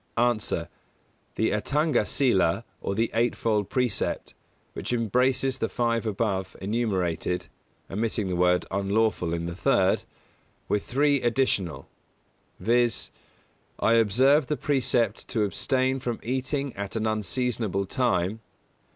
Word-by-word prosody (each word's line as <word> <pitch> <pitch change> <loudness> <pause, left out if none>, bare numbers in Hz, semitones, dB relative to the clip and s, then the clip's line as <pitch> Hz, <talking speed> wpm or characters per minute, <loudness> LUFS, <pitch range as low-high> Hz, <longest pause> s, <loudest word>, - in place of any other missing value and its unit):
_ 120 -2 +1
A. - - -2 0.7
The 110 - +1
Atthanga 145 +6 +1
Sīla, 105 - +2 0.2
or 100 - -2
the 115 +2 0
Eightfold 115 -3 +1
Precept, 125 -4 -1 0.4
which - - -5
embraces 125 +3 +1
the 115 - -1
five 115 -1 0
above 95 -3 -2
enumerated 95 -5 -1 0.4
(omitting 110 0 -1
the 90 - -1
word 90 0 +3
"unlawful" 100 -2 +1
in 85 0 -2
the 85 - -4
third), - - +2 0.7
with 105 - 0
three 145 +1 +2
additional; 120 - 0 0.7
viz.: 120 +1 +1 0.7
I 115 - +3
observe 130 +6 +4
the 150 - -1
precept 130 -4 0
to 110 -4 0
abstain 130 +6 0
from 120 -3 -3
eating 130 +2 -2
at 100 +1 -5
an 110 -1 -1
unseasonable 110 -2 -1
time. 100 -3 0
115 Hz, 120 wpm, -26 LUFS, 100-125 Hz, 0.7 s, observe